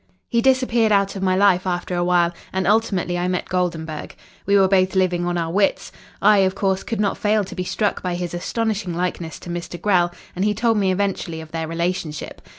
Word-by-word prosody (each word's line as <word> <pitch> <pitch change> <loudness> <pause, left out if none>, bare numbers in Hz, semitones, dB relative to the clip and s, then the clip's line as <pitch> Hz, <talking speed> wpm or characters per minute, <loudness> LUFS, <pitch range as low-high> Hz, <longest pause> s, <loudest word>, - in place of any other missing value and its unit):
"He 235 -2 +2
disappeared 245 -4 +3
out 200 -1 +2
of 195 - -5
my 185 -1 +2
life 190 -1 +3
after 175 0 -2
a 175 0 0
while, 175 -1 +2 0.2
and 190 0 -1
ultimately 195 -5 +1
I 175 - 0
met 180 -1 -2
Goldenburg. 165 -4 -3 0.3
We 200 0 +5
were 195 -1 +5
both 185 0 +2
living 180 -2 +1
on 175 0 -1
our 165 -1 -2
wits. 195 +2 +1 0.3
I, 210 0 +6
of 190 0 +2
course, 195 -1 0
could 225 - -4
not 205 -1 0
fail 210 0 +2
to 190 - -8
be 185 - -3
struck 205 +3 -1
by 180 -1 -2
his 175 -1 -4
astonishing 205 0 -2
likeness 175 -2 -3
to 175 - -7
Mr. 175 0 -5
Grell, 180 -2 +2 0.2
and 185 - -1
he 210 0 +1
told 230 +1 +2
me 195 -2 +2
eventually 185 -4 -2
of 160 -1 -10
their 160 -1 -3
relationship. 170 -2 -3
185 Hz, 215 wpm, -21 LUFS, 175-200 Hz, 0.3 s, I